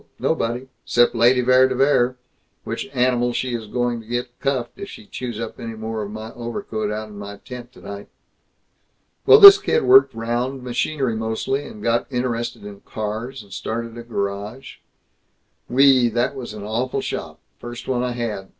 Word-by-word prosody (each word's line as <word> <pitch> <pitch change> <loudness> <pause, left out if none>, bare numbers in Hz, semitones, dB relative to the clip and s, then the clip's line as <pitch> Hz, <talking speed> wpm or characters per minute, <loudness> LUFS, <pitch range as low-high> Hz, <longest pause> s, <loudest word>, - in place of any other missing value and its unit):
Nobody. 120 +3 -1 0.2
'Cept 120 0 +3
Lady 120 +2 +4
Vere 130 +1 +5
de 130 - -2
Vere 130 -2 +2 0.5
which - - -4
animal 125 -1 +1
she 125 0 -2
is 115 -2 -4
going 120 +1 -1
to 110 - -18
get 120 +1 -4
cuffed 130 -3 -2
if 200 - -7
she 220 - -11
chews 125 - -6
up 115 -1 -6
any 115 -1 -6
more 110 0 -4
of 100 - -5
my 110 +1 -8
overcoat 115 -3 -4
out 110 0 -5
in 105 -1 -10
my 100 0 -8
tent 125 +2 -10
tonight!... 100 -4 -9 1.2
Well, 430 - +9
this 400 0 +12
kid 465 +3 +1
worked 395 +1 +6
'round, 120 +3 -2
machinery 125 0 -1
mostly, 110 +6 -2
and 105 - -11
got 115 +3 0
interested 120 -3 -3
in 100 -1 -9
cars, 110 +4 -5
and 100 -2 -14
started 115 +3 -4
a 120 - -7
garage 105 +2 -5 0.9
Wee, 130 -1 +5
that 120 +4 0
was 120 -5 -7
an 105 - -8
awful 115 +5 -2
shop, - - -5 0.2
first 120 0 -8
one 125 -2 0
I 125 -1 -1
had! 110 -5 -4
120 Hz, 175 wpm, -21 LUFS, 110-125 Hz, 1.2 s, this